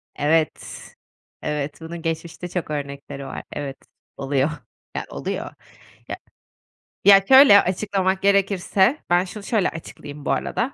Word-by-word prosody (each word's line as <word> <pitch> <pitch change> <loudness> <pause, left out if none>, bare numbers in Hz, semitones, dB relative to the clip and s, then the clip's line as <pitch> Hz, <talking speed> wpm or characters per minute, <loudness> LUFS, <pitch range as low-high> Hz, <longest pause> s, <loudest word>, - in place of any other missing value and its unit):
Evet, 155 +2 0 0.6
evet. 150 0 -4
Bunun 165 +1 -7
geçmişte 165 +2 -4
çok 175 -3 -4
örnekleri 140 -1 -6
var. 135 - -7
Evet, 140 -2 -5 0.4
oluyor. 135 +1 0 0.5
Yani, - - -3
oluyor. - - -5 0.6
Ya - - -4 0.9
ya, 195 -1 +8
şöyle 265 -6 +9
açıklamak 190 0 -1
gerekirse, 200 - +2
ben 175 +1 +3
şunu 200 +3 -9
şöyle 210 -2 +1
açıklayayım 145 -2 -10
bu - - 0
arada: 255 +3 -1
175 Hz, 125 wpm, -22 LUFS, 145-195 Hz, 0.9 s, şöyle